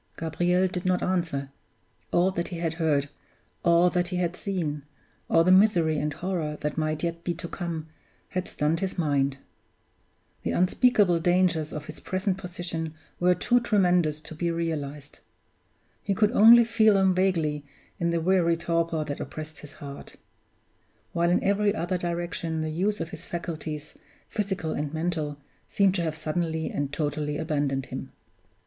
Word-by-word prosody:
Gabriel 175 +3 +1
did 180 -1 -4
not 185 -1 +1
answer. 165 -7 -1 0.6
All 180 +2 +3
that 170 -2 -2
he 175 - -6
had 165 -1 -1
heard, 145 -3 +2 0.5
all 170 +1 +4
that 175 -1 +1
he 180 - -4
had 175 -1 -1
seen, 165 -8 -3 0.5
all 165 - +5
the 185 - +4
misery 180 -6 +4
and 150 +1 -1
horror 160 -2 -3
that 150 -1 -2
might 155 0 -1
yet 170 0 -2
be 175 - -2
to 170 +1 -6
come, 170 -3 -4 0.4
had 185 0 -3
stunned 155 +2 0
his 190 -1 -3
mind. 140 -4 +1 1.0
The - - -2
unspeakable 185 -1 +3
dangers 175 -3 +2
of 150 -1 -6
his - - -9
present 190 0 -2
position 170 -3 -5 0.2
were 180 0 +4
too 245 +6 +3
tremendous 180 -9 +2
to 155 - -9
be 170 +2 -1
realized. 150 -4 -4 0.8
He 200 - -1
could 210 +2 +3
only 235 0 +8
feel 220 -2 +4
them 190 -1 +4
vaguely 165 -6 +1 0.4
in 170 - +1
the 170 -1 0
weary 170 -1 +3
torpor 165 -1 0
that 145 -1 -4
oppressed 155 0 -7
his 145 -1 -11
heart; 140 -2 -9 1.0
while 170 0 +2
in 175 - +2
every 205 +1 +2
other 175 +1 -1
direction 170 -2 -3
the 155 0 -2
use 200 +6 0
of 165 - -3
his - - -9
faculties, 155 -3 -5 0.3
physical 190 -6 -2
and 145 -1 -2
mental, 160 -3 -2 0.3
seemed 195 -2 +3
to 180 - 0
have 160 -2 -2
suddenly 160 0 -2
and 145 -1 -2
totally 145 0 -2
abandoned 145 -4 -1
him. - - -7
170 Hz, 160 wpm, -27 LUFS, 155-185 Hz, 1.0 s, only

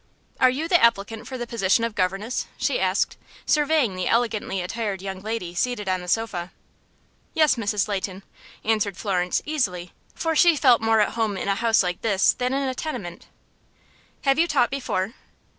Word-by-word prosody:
"Are 255 - +6
you 285 +6 -2
the 350 -5 +4
applicant 225 0 +1
for 260 - -5
the 240 - -4
position 230 -1 +1
of 230 -1 -1
governess?" 195 +5 -1
she - - 0
asked, - - 0 0.3
surveying 295 -8 +2
the 185 -1 -2
elegantly 225 -4 0
attired 200 +2 -3
young 190 0 -6
lady 215 -5 -4
seated 210 +2 -1
on 185 -1 0
the 180 - -9
sofa. 185 -4 -1 0.8
"Yes, 310 -2 +5
Mrs. 210 -4 -1
Leighton," 195 -1 -4 0.4
answered 215 -3 0
Florence, 180 -3 -1
easily, 185 - -2 0.2
for 325 -1 -1
she 340 +1 +6
felt 255 -6 +4
more 225 -1 +3
at - - +1
home 220 -3 -1
in - - -4
a 200 - +3
house 225 0 +2
like 180 -1 -3
this 200 -4 +3
than 250 0 -2
in 275 +1 0
the 260 - -1
tenement. 200 - -6 1.0
"Have 275 +1 +3
you 340 - +4
taught 270 -7 +2
before?" 230 -6 -2
225 Hz, 175 wpm, -24 LUFS, 190-255 Hz, 1.0 s, Are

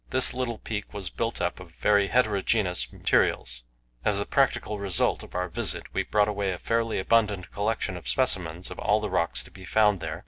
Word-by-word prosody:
This 130 0 +5
little 125 -3 -3
peak 105 -2 -6
was 95 -4 -5
built 115 0 -2
up 90 +1 -2
of 90 -3 -13
very 100 -1 +3
heterogenous 105 -5 +1
materials. - - 0 0.4
As 105 - +1
the 100 - -1
practical 125 -6 0
result 95 -4 +1
of - - -12
our 90 0 -1
visit, 85 - -1
we - - +1
brought 105 -1 +2
away 100 -2 -1
a 90 - -4
fairly 115 +2 -1
abundant 105 -2 +1
collection 105 -2 -2
of 85 -6 -9
specimens 85 +7 +1
of - - -8
all 105 +1 +2
the 105 -2 -4
rocks 85 -2 0
to - - -16
be 95 - -13
found 105 +1 +3
there. 80 0 -5
100 Hz, 200 wpm, -26 LUFS, 90-110 Hz, 0.4 s, This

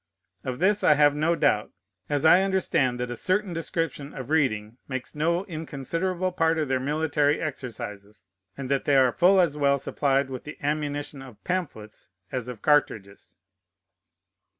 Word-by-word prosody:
Of 130 -1 -4
this 200 +6 +2
I 150 - +6
have 145 0 +4
no 160 +3 +1
doubt; 105 -9 +1 0.4
as 145 +1 0
I 175 +4 +7
understand 185 -10 +1
that 125 0 -3
a - - -3
certain 185 - 0
description 165 -3 -3
of 135 +2 -7
reading 120 -7 0
makes 130 -1 -5
no 170 +5 0
inconsiderable 170 +3 -3
part 165 -2 +1
of 155 -2 0
their 130 -1 +1
military 150 +1 +1
exercises, 105 - -7 0.3
and 135 -2 -5
that 140 - 0
they 145 - +3
are 130 -2 +5
full 185 +8 +4
as 165 -5 +2
well 140 -1 +3
supplied 135 0 0
with 130 - -6
the 150 - -9
ammunition 145 -1 -3
of 125 -6 -13
pamphlets 140 - -5 0.2
as 125 -2 -3
of 120 -4 -8
cartridges. 110 -10 0
145 Hz, 160 wpm, -26 LUFS, 130-165 Hz, 0.4 s, I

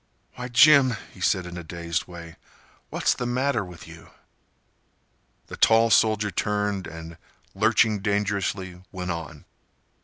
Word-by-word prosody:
"Why, 125 0 -6
Jim," 130 0 +6 0.2
he - - -15
said, 95 -1 +1
in 90 0 -7
a - - -8
dazed 85 0 -4
way, 85 -2 -11 0.5
"what's - - +1
the 125 - -4
matter 125 -2 0
with 90 -3 -12
you?" 80 0 -13 1.4
The - - -10
tall 115 0 +4
soldier 110 -2 +3
turned 105 0 -1
and, 80 0 -10 0.3
lurching 110 0 +2
dangerously, 100 -2 -2
went 90 -2 -4
on. 80 -3 -7
100 Hz, 130 wpm, -25 LUFS, 85-110 Hz, 1.4 s, Jim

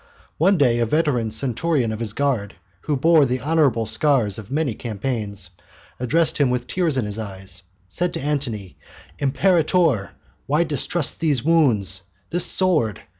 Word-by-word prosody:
One 190 +5 +4
day 125 -6 +3
a 115 - +1
veteran 140 -5 +1
centurion 125 +3 -1
of 110 - -5
his 110 -3 -3
guard, 115 -9 -1 0.3
who 150 - 0
bore 160 +2 +5
the 130 -1 0
honourable 145 -6 +1
scars 110 -2 +1
of 105 -1 -11
many 145 -2 -1
campaigns, 105 -5 -4 0.5
addressing 145 +2 +2
him - - -1
with 125 0 -1
tears 170 -4 -1
in 125 - 0
his 105 +1 -4
eyes, 95 -3 -6 0.3
said 175 - -2
to - - -3
Antony: 130 -10 -3 0.4
"Imperator, 155 - +2 0.4
why 150 +4 +2
distrust 155 0 0
these 145 -7 +1
wounds, 120 - +2 0.3
this 175 +1 +2
sword? 155 - +1
130 Hz, 150 wpm, -22 LUFS, 110-155 Hz, 0.5 s, bore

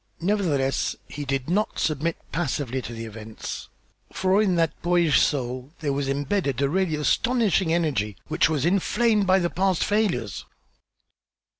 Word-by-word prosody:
Nevertheless, 165 -8 0
he 145 0 -6
did 135 -1 -2
not 205 +6 0
submit 155 +2 0
passively 135 -6 -2
to 120 - -7
the 115 0 -6
events, 110 0 -7 0.4
for 190 +2 +2
in 190 -4 +2
that 165 -2 +2
boyish 175 -3 +3
soul 130 0 -1
there 145 -3 0
was 140 0 -1
imbedded 140 - -1
a 140 -1 +2
really 180 -1 +1
astonishing 190 - +2
energy, 135 - 0
which - - +2
was 150 -3 0
inflamed 205 +3 +2
by 190 0 +5
the 175 -2 0
past 190 -1 +1
failures. 205 - 0
160 Hz, 145 wpm, -25 LUFS, 135-190 Hz, 0.4 s, by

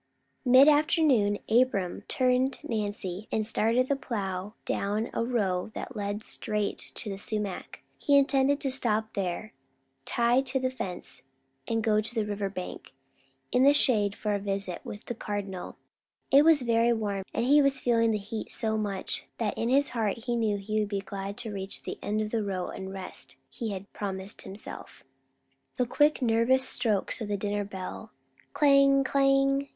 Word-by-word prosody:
Mid 255 +3 +7
afternoon 290 -9 +4
Abram 220 -6 +2
turned 255 +1 +2
Nancy 205 -5 -3
and 215 -1 0
started 230 +3 +2
the 280 - +1
plow 205 -5 -4
down 210 +3 -1
a - - 0
row 205 -6 0
that 250 - -6
led 205 0 -3
straight 210 -2 -2 0.2
to - - -3
the 195 -1 -4
sumac. 205 -3 -4 0.2
He 285 -1 +4
intended 275 0 +3
to 270 - 0
stop 220 -4 +1
there, 195 +2 -3 0.5
tie 240 +2 +3
to 265 0 -1
the 255 0 -1
fence, 185 -8 -6 0.5
and 225 -1 0
go 215 -1 +3
to 225 +3 -4
the 220 -2 +1
river 205 -1 -2
bank, 185 -7 -7 0.6
in 250 - +3
the 280 +2 +7
shade, 210 -8 +3
for 210 -1 -2
a 200 - 0
visit 195 -2 -2
with 205 - -8
the - - -4
Cardinal. 200 -4 -5 0.6
It 280 +2 +7
was 315 -4 +5
very 235 0 +3
warm, 205 -3 -2
and 230 - -1
he 290 +3 +6
was 275 -1 +3
feeling 230 -2 +2
the 215 - +1
heat 210 +2 -6
so 220 -1 0
much, 200 -3 -2
that 220 -3 -1
in 230 - -1
his 280 +2 +3
heart 225 -2 -2
he 240 -2 0
knew 220 -3 +1
he 215 +2 -2
would 210 -1 -1
be 200 -1 -2
glad 195 0 -6
to 220 -3 -4
reach 195 0 -6
the - - -6
end 215 +1 -1
of 215 0 -3
the 225 -2 0
row 190 -3 -3
and 190 - -6
the - - -7
rest 190 -1 -6 0.2
he 230 - -4
had 195 0 -7
promised 195 0 -5
himself. 200 +3 -9 0.7
The 250 - +2
quick 295 +3 +2
nervous 245 +3 +3
strokes 225 -1 -1
of 220 - -3
the 205 0 -1
dinner 205 +1 -1
bell, 190 -2 -7 0.4
"Clang! 275 -1 +5
Clang!" 275 0 +2
220 Hz, 175 wpm, -28 LUFS, 200-255 Hz, 0.7 s, Mid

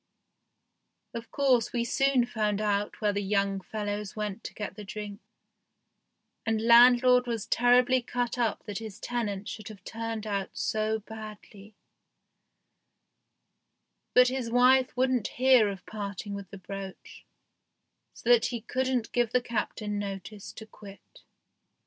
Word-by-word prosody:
Of 230 -1 -7
course 260 -5 +2
we 235 -1 -1
soon 270 0 +2
found 215 -4 -1
out 205 0 -1
where 210 -1 +2
the 200 - -1
young 200 -1 0
fellows 205 0 -4
went 210 0 -4
to - - -6
get 210 - -5
the 210 - -8
drink, 205 +1 -7 1.2
and 225 -1 0
landlord 245 +2 +6
was 230 -3 -2
terribly 250 +1 +4
cut 245 0 -2
up 230 -3 0
that 205 -2 -4
his 220 -1 -8
tenant 210 -4 -3
should 215 -3 -7
have 205 -4 -11
turned 225 -1 -5
out 200 -2 -3
so 220 0 -1
badly, 215 -1 -11 2.4
but 250 0 +7
his 255 -2 -3
wife 250 +1 +4
wouldn't 255 -4 +2
hear 255 -4 +5
of 195 -3 -7
parting 205 -1 -6
with 200 -2 -7
the 195 - -9
brooch, 195 0 -9 0.9
so - - -11
that 240 -1 +5
he 240 -2 -4
couldn't 255 0 -1
give 240 -2 +1
the 250 - +3
Captain 215 -3 -3
notice 200 +1 -6
to 220 - -10
quit. 200 -2 -15
220 Hz, 135 wpm, -28 LUFS, 205-245 Hz, 2.4 s, but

